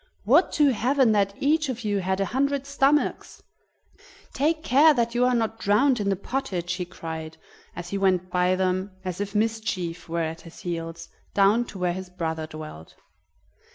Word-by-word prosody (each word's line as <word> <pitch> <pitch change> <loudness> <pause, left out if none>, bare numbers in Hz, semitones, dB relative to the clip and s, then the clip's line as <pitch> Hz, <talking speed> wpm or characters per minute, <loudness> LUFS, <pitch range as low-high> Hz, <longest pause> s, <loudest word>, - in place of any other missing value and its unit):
"Would 290 - +4
to 295 -2 +4
heaven 255 0 +2
that 200 -2 +1
each 300 +1 +2
of 245 -2 -4
you 205 -2 0
had 190 +1 -1
a 195 - +1
hundred 280 +1 0
stomachs! 280 +1 0 0.9
Take 310 +3 0
care 295 +2 +5
that 235 -1 0
you 245 +1 +2
are 250 0 +2
not 225 -1 -1
drowned 240 +5 +3
in 200 -1 0
the 195 - +2
pottage!" 185 -5 -3
he 185 -1 -3
cried 160 -2 -7 0.4
as 175 0 -7
he 200 - -2
went 185 -2 +1
by 180 +1 +2
them 185 +1 -1
as 185 +1 -3
if 200 +1 -4
Mischief 210 -7 -2
were 170 0 -1
at 160 +1 -4
his 165 - -13
heels, 165 -1 -5 0.3
down 205 +4 +4
to 210 - -10
where 180 -1 0
his 185 0 -7
brother 160 -3 -3
dwelt. 155 - -10
200 Hz, 180 wpm, -25 LUFS, 180-250 Hz, 0.9 s, care